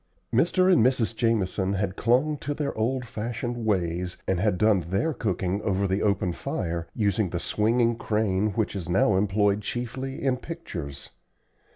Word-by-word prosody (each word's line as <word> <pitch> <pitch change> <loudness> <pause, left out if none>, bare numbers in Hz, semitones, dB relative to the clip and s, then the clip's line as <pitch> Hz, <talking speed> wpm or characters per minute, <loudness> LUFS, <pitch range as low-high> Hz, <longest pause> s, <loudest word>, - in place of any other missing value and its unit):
Mr. 185 +9 +4
and 165 - +5
Mrs. 120 -3 +2
Jamison 105 -4 +1
had 95 -1 -1
clung 130 +8 +2
to 145 +1 -3
their 145 -1 -2
old 125 +3 -1
fashioned 115 +2 -4
ways, 90 -4 -1
and 95 -2 +1
had 100 -1 +1
done 105 0 +4
their 95 - -1
cooking 95 -4 -1
over 100 -2 0
the 95 +2 0
open 100 -3 +1
fire, 85 0 -3
using 105 -2 +1
the 85 - -3
swinging 115 +5 +1
crane 105 -3 0
which 110 +1 -1
is 90 -4 -5
now 95 +2 +3
employed 100 +1 +2
chiefly 125 +4 -4
in 130 -2 +2
pictures. 90 - -7
105 Hz, 160 wpm, -26 LUFS, 95-120 Hz, -, and